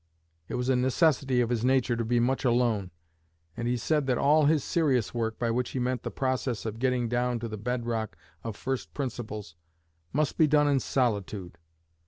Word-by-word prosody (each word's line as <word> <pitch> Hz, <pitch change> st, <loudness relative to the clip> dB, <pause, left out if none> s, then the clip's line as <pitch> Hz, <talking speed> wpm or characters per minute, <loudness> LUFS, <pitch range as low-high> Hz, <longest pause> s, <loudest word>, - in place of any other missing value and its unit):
It -, -, -4 dB
was 125 Hz, 0 st, -2 dB
a 130 Hz, -, +3 dB
necessity 130 Hz, 0 st, +2 dB
of 120 Hz, 0 st, 0 dB
his 120 Hz, -2 st, 0 dB
nature 130 Hz, -2 st, +2 dB
to 115 Hz, -, -1 dB
be 120 Hz, +2 st, +1 dB
much 130 Hz, +3 st, +1 dB
alone; 120 Hz, -6 st, +1 dB, 0.7 s
and 120 Hz, -, -3 dB
he 125 Hz, +1 st, +1 dB
said 150 Hz, +3 st, 0 dB
that 125 Hz, -2 st, +2 dB
all 150 Hz, +2 st, +4 dB
his 150 Hz, -2 st, +3 dB
serious 140 Hz, -10 st, +1 dB
work 115 Hz, -2 st, -2 dB
by 115 Hz, -1 st, 0 dB
which 125 Hz, +1 st, -1 dB
he 130 Hz, -, -3 dB
meant 125 Hz, -1 st, -1 dB
the -, -, -4 dB
process 130 Hz, -3 st, -2 dB
of 110 Hz, 0 st, -4 dB
getting 125 Hz, -1 st, +1 dB
down 120 Hz, +1 st, 0 dB
to 115 Hz, 0 st, -4 dB
the 110 Hz, -, -5 dB
bed 120 Hz, +3 st, -3 dB
rock 110 Hz, -7 st, -3 dB, 0.3 s
of 115 Hz, -2 st, -5 dB
first 130 Hz, +4 st, -4 dB
principles 110 Hz, -, -5 dB, 0.6 s
must 150 Hz, +3 st, 0 dB
be 160 Hz, -, +6 dB
done 150 Hz, 0 st, +4 dB
in 140 Hz, -2 st, +3 dB
solitude. 100 Hz, -9 st, -2 dB
125 Hz, 200 wpm, -28 LUFS, 115-130 Hz, 0.7 s, be